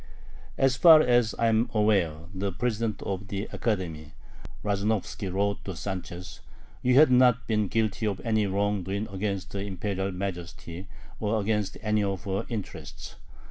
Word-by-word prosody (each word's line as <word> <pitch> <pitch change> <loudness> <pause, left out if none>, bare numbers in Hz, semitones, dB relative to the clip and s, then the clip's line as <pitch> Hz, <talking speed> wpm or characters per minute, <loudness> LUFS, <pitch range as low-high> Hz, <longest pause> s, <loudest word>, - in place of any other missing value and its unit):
"As 135 -1 +3
far 160 0 +9
as 120 -4 +3
I 115 - +1
am 115 +1 +3
aware" 95 -8 +2
the 100 +1 -2
president 110 +1 -2
of 95 0 -4
the 100 +1 -4
Academy, 80 -8 -3 0.5
Razumovski, 100 -1 -1
wrote 100 +2 0
to 95 - -5
Sanchez 90 0 -6 0.4
"you 125 0 +3
have 150 0 +7
not 125 -1 +5
been 105 -2 +1
guilty 110 +1 0
of 100 -3 -2
any 110 -3 +1
wrong 100 +1 0
doing 100 +4 -3
against 95 -1 -3
her 100 - -3
Imperial 100 0 -3
Majesty 90 -1 -6 0.3
or 110 +1 0
against 105 -1 -1
any 105 -1 +2
of 95 -2 -2
her 100 +2 -2
interests. 110 -5 -7
100 Hz, 150 wpm, -27 LUFS, 95-110 Hz, 0.5 s, far